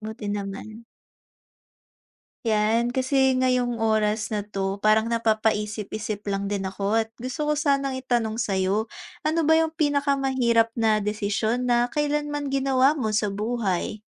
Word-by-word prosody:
Buti 215 0 -7
naman. 205 +2 -5 1.6
'Yan, 225 +1 +2
kasi 265 0 +2
ngayong 250 -2 +1
oras 220 0 0
na 205 - -1
'to, 195 -1 -4
parang 215 +1 +4
napapaisip-isip 215 -2 -1
lang 200 0 -2
din 200 -2 -2
ako 200 +3 -1
at 225 - -35
gusto 255 +5 -4
ko 300 - +2
sanang 275 -3 +1
itanong 240 -4 -1
sayo. 195 +2 0 0.3
Ano 315 0 +1
ba 320 - +5
yung 320 0 +3
pinakamahirap 270 -6 +1
na 220 -2 +2
desisyon 210 +3 -1
na 240 0 +3
kailanman 295 0 -1
ginawa 270 +1 +2
mo 220 -5 -1
sa 210 -1 +1
buhay? 210 -1 -2
225 Hz, 130 wpm, -25 LUFS, 210-265 Hz, 1.6 s, ba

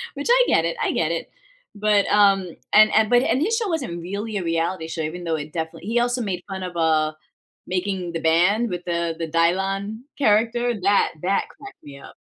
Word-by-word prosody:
Which 285 - -4
I - - +6
get 165 - +3
it, 170 - -2
I - - +1
get 165 -1 0
it. 165 - -4 0.5
But, 210 -1 +2
um, 195 -3 +3 0.2
and 215 0 +6
and, 220 0 +3
but, 245 0 +4
and 255 +3 +1
his 435 +8 +1
show 455 -3 -1
wasn't 260 - -3
really 205 +5 -4
a 190 - -3
reality 165 0 -1
show, 165 0 -4
even 160 +3 -5
though 165 -2 -1
it 150 0 -6
definitely 160 +2 -5
he 235 +1 +2
also 245 +1 0
made 185 -5 -3
fun 190 -1 -5
of, 180 -1 -6
uh, 155 -1 +2 0.5
making 185 -1 -3
the 165 - -3
band 180 +8 +3
with 175 -1 -5
the 170 -1 -1
the 165 -1 -4
Dylon 195 +6 0 0.2
character. 240 0 +2
That 200 +2 +2
that 195 +2 0
cracked 405 0 -14
me 140 -1 -11
up. - - -13
190 Hz, 210 wpm, -22 LUFS, 165-220 Hz, 0.5 s, I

